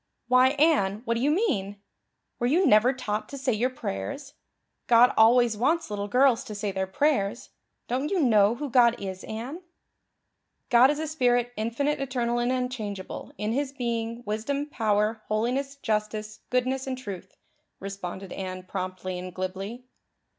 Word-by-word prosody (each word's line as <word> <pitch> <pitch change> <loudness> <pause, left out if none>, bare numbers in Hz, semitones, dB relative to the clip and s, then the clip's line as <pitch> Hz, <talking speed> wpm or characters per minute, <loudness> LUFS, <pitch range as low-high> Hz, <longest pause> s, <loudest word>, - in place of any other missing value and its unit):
"Why, 255 +1 +5
Anne, 235 -10 +2
what 230 - +1
do 230 - -1
you 280 - +2
mean? 205 - 0 0.6
Were 240 - +1
you 340 +8 +3
never 235 -1 +5
taught 215 -5 -4
to 280 - -7
say 260 -2 0
your 235 +4 +1
prayers? 255 - -5 0.5
God 240 0 +6
always 235 +1 +5
wants 290 +4 0
little 205 0 -3
girls 250 +2 +3
to 215 -4 -7
say 205 0 -2
their 190 0 -2
prayers. 230 -1 0 0.4
Don't 265 +5 -1
you 390 - 0
know 220 -6 +4
who 290 +3 -4
God 240 -1 +5
is, 190 -1 -6
Anne?" 245 +10 -6 1.1
"'God 245 +2 +7
is 295 - 0
a 315 - -2
spirit, 245 -5 +1
infinite, 235 +7 -1
eternal 245 -3 -1
and 240 +1 +1
unchangeable, 235 -7 -4
in 210 +2 -2
His 275 +2 -1
being, 235 -2 -3
wisdom, 225 +8 -2
power, 220 -5 0
holiness, 250 +6 -1
justice, 215 -3 -3
goodness, 255 +1 0
and 260 -1 -2
truth,'" 195 -7 -8 0.4
responded 195 -1 -6
Anne 185 -1 -5
promptly 185 -1 -5
and 185 0 -7
glibly. 195 +6 -5
235 Hz, 155 wpm, -26 LUFS, 205-260 Hz, 1.1 s, God